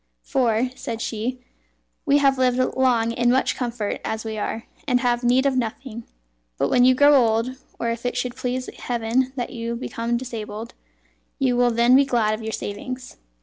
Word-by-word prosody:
"For," 245 -1 +1
said 245 -4 -5
she, 230 +2 -3 0.7
"we 280 0 +5
have 275 -2 +3
lived 250 -1 +3 0.2
long 240 -3 +2
in 240 +1 +1
much 260 +1 +2
comfort 235 -4 -3
as 220 0 -3
we 220 -1 -4
are, 220 +1 -3 0.2
and 250 -2 +3
have 245 -1 +1
need 250 +3 +3
of 275 -1 +2
nothing; 235 -1 -4 0.5
but - - +1
when 245 - +5
you 255 0 +6
grow 285 +2 +6
old, 230 -2 +3 0.3
or 235 - 0
if 230 0 -5
it 245 0 -2
should 250 -1 -2
please 255 +1 -3
Heaven 245 +2 0
that 245 -3 -3
you 235 -1 -4
become 235 0 -2
disabled, 225 -2 -6 0.6
you 260 -3 +1
will 245 0 +4
then 235 +2 +4
be 275 - +7
glad 235 -5 +1
of 215 - -4
your 220 0 -4
savings." 250 +6 -6
245 Hz, 185 wpm, -23 LUFS, 230-255 Hz, 0.7 s, be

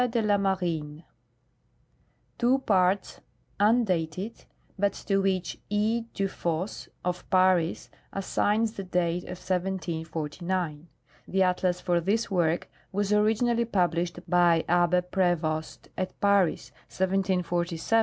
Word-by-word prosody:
de 235 0 0
la 210 -2 +3
Marine," 170 -6 -1 1.4
two 250 +2 +4
parts, 195 -6 +1 0.4
undated, 200 -3 +1 0.3
but 200 +1 +1
to 195 -1 -1
which 190 -2 -1
E. 220 +3 +1
Dufosse, 185 -2 -2 0.2
of 180 0 -3
Paris, 185 -2 +2 0.2
assigns 210 +3 0
the 200 -3 -6
date 180 -1 -1
of 180 - -7
1749. 170 -2 -3 0.4
The 190 0 +2
atlas 180 -1 +1
for 175 -1 +1
this 205 +5 0
work 170 -2 +1 0.2
was 205 +1 0
originally 225 +3 +2
published 175 -4 -1
by 175 -2 +4
Abbe 175 +1 +3
Prevost 175 -4 -1
at 185 - -4
Paris, 200 -4 +2 0.2
1747, 185 -2 0
et - - -7
seq. 225 +7 +2
185 Hz, 115 wpm, -27 LUFS, 175-200 Hz, 1.4 s, two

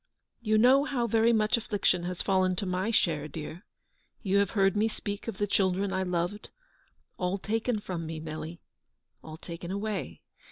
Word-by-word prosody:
You 215 -2 +2
know 255 +5 +6
how 250 -5 0
very 230 +1 +3
much 215 0 +3
affliction 200 -5 0
has 180 0 -3
fallen 185 -1 +2
to 200 - -3
my 185 +3 -1
share, 160 -9 +1
dear. 155 +4 -7 0.6
You 195 -1 +2
have 200 - +2
heard 195 0 +4
me 210 +2 +3
speak 205 -1 -5
of 225 -4 -4
the 205 - +1
children 195 -1 +1
I 190 - 0
loved; 180 +3 -2 0.7
all 180 +2 0
taken 225 +3 -1
from 175 -5 -5
me, 160 0 -5
Nelly, 155 +2 -6 0.6
all 155 0 -9
taken 170 +1 -7
away. 200 +1 -3
195 Hz, 170 wpm, -29 LUFS, 175-215 Hz, 0.7 s, know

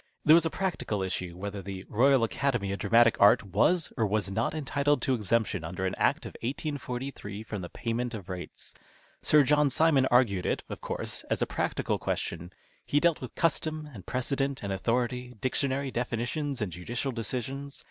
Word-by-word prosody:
There 155 - +8
was 165 0 +6
a - - -2
practical 160 - -2
issue, 90 -2 -4
whether 100 +1 -5
the 95 0 -7
Royal 130 +3 +4
Academy 115 -4 0
of 100 - -3
Dramatic 115 +3 +5
Art 100 - +7
was 120 - +2
or 110 - +1
was 100 -2 0
not 115 +9 0
entitled 145 -1 +1
to 135 - +2
exemption 110 -5 0
under 90 +4 -3
an 95 - -1
Act - - +2
of - - -8
1843 125 -5 -4
from 105 -3 -5
the 90 - -6
payment 120 +1 -3
of 100 -5 -8
rates. 90 -1 -8 0.5
Sir 150 -1 +5
John 150 +1 +4
Simon 140 -2 +4
argued 115 -8 +3
it, - - -1
of - - -6
course, - - -4
as - - +1
a - - +2
practical - - -1
question. 85 +2 -3 0.3
He 145 - +2
dealt 170 0 +2
with 125 - -7
custom 155 -1 0
and 100 -5 -9
precedent 135 +4 -1
and 100 -1 -2
authority, 125 +4 -1
dictionary 135 +2 0
definitions 125 +3 -2
and 95 - -4
judicial 120 - -3
decisions. 130 +4 -4
120 Hz, 180 wpm, -29 LUFS, 100-140 Hz, 0.5 s, There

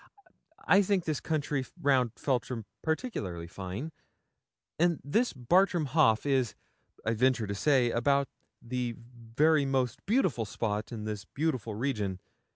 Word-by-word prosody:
I 200 - +7
think 195 -2 +1
this 155 -3 -1
country 145 -3 -1 0.2
round 130 -7 +2
Feltram 125 -4 -2 0.2
particularly 155 - -3
fine; 95 - -6 0.9
and 170 -2 +3
this 225 - +1
Bartram 175 +6 +2
Haugh 130 -7 +5
is, 130 -6 +1 0.5
I 115 - +2
venture 125 0 +2
to 100 - -3
say, 125 +2 +3
about 140 +4 +2 0.3
the 120 0 -3
very 125 +6 +1
most 130 -3 -1
beautiful 185 - +2
spot 105 +1 -3
in 110 -3 -5
this 105 -2 -4
beautiful 130 -7 -2
region. 105 -6 -2
130 Hz, 130 wpm, -30 LUFS, 115-155 Hz, 0.9 s, I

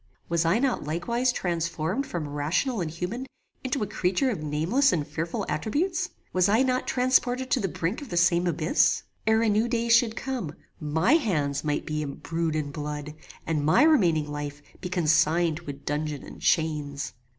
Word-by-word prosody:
Was 170 0 +1
I 170 +6 +3
not 260 0 0
likewise 235 - 0
transformed 170 - -2
from 165 -4 -4
rational 160 - -1
and 165 - -2
human 180 +11 -4 0.4
into 260 -2 -1
a - - 0
creature 205 +5 0
of 190 -9 -4
nameless 165 - +2
and 150 -4 0
fearful 165 +3 -3
attributes? 340 - -1 0.2
Was 185 +1 +3
I 220 +5 +4
not 255 -1 0
transported 255 0 +1
to - - +3
the 195 - 0
brink 180 - -3
of 285 - -9
the 175 - -3
same 175 0 +3
abyss? 165 -1 +2 0.2
Ere 220 +1 +4
a - - +2
new 215 +2 +2
day 235 -1 -1
should 230 -1 +4
come, 235 - -4 0.2
my 160 - +2
hands 150 - +1
might 150 -1 -1
be 155 0 -2
embrued 160 +3 -3
in 150 -2 -2
blood, 150 0 -5 0.3
and 155 -3 0
my 155 - +5
remaining 175 - +4
life 145 0 -6 0.2
be 180 - -4
consigned 165 -1 +2
to 165 -3 -9
a - - -3
dungeon 145 +1 -3
and - - -11
chains. 150 -4 0
170 Hz, 180 wpm, -26 LUFS, 150-235 Hz, 0.4 s, my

